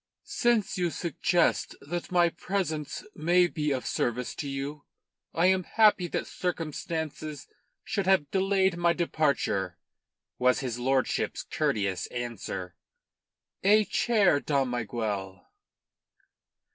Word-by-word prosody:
"Since 235 -5 +1
you 175 -1 +1
suggest 170 +1 0
that 175 +5 -5
my 175 -1 +4
presence 170 -4 -3
may 175 +3 +3
be 150 -3 -2
of 130 -3 -1
service 120 +1 -1
to 145 - -5
you, 140 +2 -5 0.5
I 165 - +1
am 185 0 +4
happy 210 -3 +4
that - - -2
circumstances 155 -3 -4 0.4
should 200 -3 -2
have 185 -7 +3
delayed 190 -2 +2
my 170 0 +3
departure," 140 - 0 0.6
was 125 0 +3
his 120 -3 -3
lordship's 130 +1 0
courteous 100 -4 -1
answer. 115 -7 -5 0.9
"A 210 +2 +5
chair, 195 -4 +3
Dom 140 -3 0
Miguel." 105 -5 -4
155 Hz, 110 wpm, -28 LUFS, 125-180 Hz, 0.9 s, A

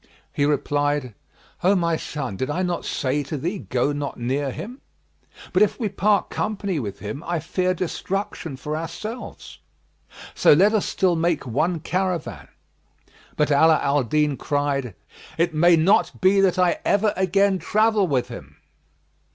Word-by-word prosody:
He 145 - +1
replied, 145 -2 0 0.5
"O 190 +3 +4
my 170 -3 +1
son, 140 -8 -5
did 130 +8 -3
I 180 +5 -1
not 175 -2 -2
say 140 +2 -1
to 145 +2 -5
thee, 175 +8 -3
'Go 130 0 -1
not 145 -1 -4
near 135 +4 -1
him'? 245 - -8 0.7
But - - +3
if 210 - +2
we 220 -4 -1
part 200 0 +1
company 200 -5 -2
with 105 -6 -5
him, 110 +9 -6
I 175 0 -2
fear 185 +3 -1
destruction 185 -3 -4
for 150 +4 -4
ourselves; 210 +9 -7 0.7
so - - +5
let 195 +8 +4
us 215 - +1
still 185 -2 +1
make 165 -3 0
one 155 +7 -1
caravan." 185 +1 -3 0.9
But 150 0 +1
Ala 160 +3 +5
al 140 0 +1
Din 150 +3 0
cried, 140 -6 -2 0.4
"It 170 0 +1
may 170 +3 +5
not 175 +1 +2
be 195 +1 +4
that 190 -1 +2
I 180 -2 +2
ever 205 +1 +2
again 190 +1 +2
travel 215 -1 +2
with 130 -5 0
him." 120 - -10
165 Hz, 155 wpm, -23 LUFS, 145-190 Hz, 0.9 s, so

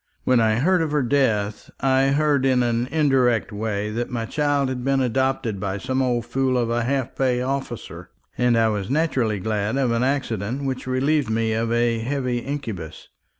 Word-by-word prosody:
When 130 -2 +3
I 110 -1 +3
heard 175 +9 +2
of 160 - 0
her 145 -2 +2
death, 110 -6 0
I 135 0 +3
heard 145 -1 +2
in 130 -2 +3
an 120 0 0
indirect 135 -6 +2
way 105 0 -3
that 120 +2 -3
my 115 -2 -3
child 145 +1 0
had 125 -1 -4
been 135 +1 +1
adopted 130 -4 0
by 95 0 -2
some 130 +4 -1
old 120 -3 0
fool 130 0 0
of 120 -1 0
a 120 0 0
half 130 0 -2
pay 130 -2 +1
officer; 135 -3 -5 0.3
and 125 -1 +2
I 115 -1 +4
was 105 -2 -3
naturally 130 -8 0
glad 105 +3 -1
of 130 -3 +1
an 115 0 +1
accident 130 -2 -1
which 130 -1 -3
relieved 135 +1 +1
me 110 0 0
of 115 +1 -1
a 120 -1 +1
heavy 125 0 -1
incubus. 115 - -6
125 Hz, 190 wpm, -23 LUFS, 115-135 Hz, 0.3 s, I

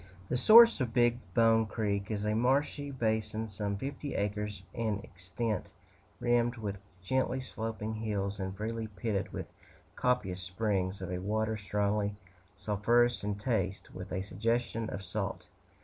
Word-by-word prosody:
The - - +1
source 225 - +8
of 120 -2 -2
Big 120 0 +4 0.2
Bone 115 -1 +5
Creek 100 -2 -1
is 105 -1 -2
a 105 - +1
marshy 140 +5 +1
basin 110 -3 -1
some 100 -1 -3
fifty 140 +5 -4
acres 105 0 -2
in 110 -3 0
extent, 100 +6 -4 0.5
rimmed 120 0 +2
with 100 -3 -4 0.2
gently 130 +5 +1
sloping 110 -3 -4
hills, 105 -2 -2
and 95 0 -4
freely 110 +1 -3
pitted 105 0 -2
with - - -4 0.5
copious 95 -8 0
springs 95 0 -1
of 90 - -4
a 90 - -2
water 110 +3 0
strongly 105 0 0 0.4
sulphurous 115 +4 +2
in 105 0 -1
taste, 100 -3 -2
with 95 +1 -8
a 95 - -1
suggestion 115 +2 -1
of 100 - -5
salt. 90 - -3
110 Hz, 145 wpm, -32 LUFS, 100-115 Hz, 0.5 s, source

